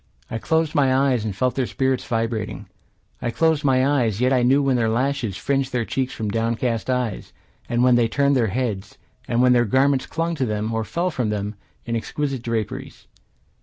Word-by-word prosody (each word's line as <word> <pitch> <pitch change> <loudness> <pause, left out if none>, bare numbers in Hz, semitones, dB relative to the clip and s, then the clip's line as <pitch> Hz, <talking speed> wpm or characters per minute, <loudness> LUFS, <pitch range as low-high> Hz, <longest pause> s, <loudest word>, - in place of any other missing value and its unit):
I 115 - -2
closed 160 +4 0
my 140 -4 +3
eyes 130 -4 +2
and 105 -3 -3
felt 125 +4 +1
their 130 -2 -1
spirits 130 -1 0
vibrating. 115 -3 -2 0.6
I 120 - -1
closed 160 +4 +1
my 130 -2 +3
eyes, 120 -8 +1
yet 130 +2 +3
I 125 - +3
knew 135 +4 +4
when 135 -2 +2
their 115 -2 +1
lashes 120 -3 -1
Fringed 135 +3 -1
their 120 -2 -1
cheeks 130 +2 -2
from 110 -2 -4
downcast 115 +1 -1
eyes, 125 -5 -2 0.4
And 120 +1 +1
when 125 0 +5
they 120 -1 +4
turned 140 +4 +2
their 120 -4 +2
heads; 105 -3 -3 0.3
And 120 -1 +2
when 125 0 +5
their 120 -1 +4
garments 130 +3 +2
clung 165 +1 -2
to 135 - 0
them, 105 +1 -2
Or 110 0 0
fell 175 +10 -1
from 125 -8 -1
them, 105 0 -2 0.3
in 115 - -2
exquisite 135 +3 -3
draperies. 115 -3 -4
125 Hz, 200 wpm, -22 LUFS, 115-135 Hz, 0.6 s, when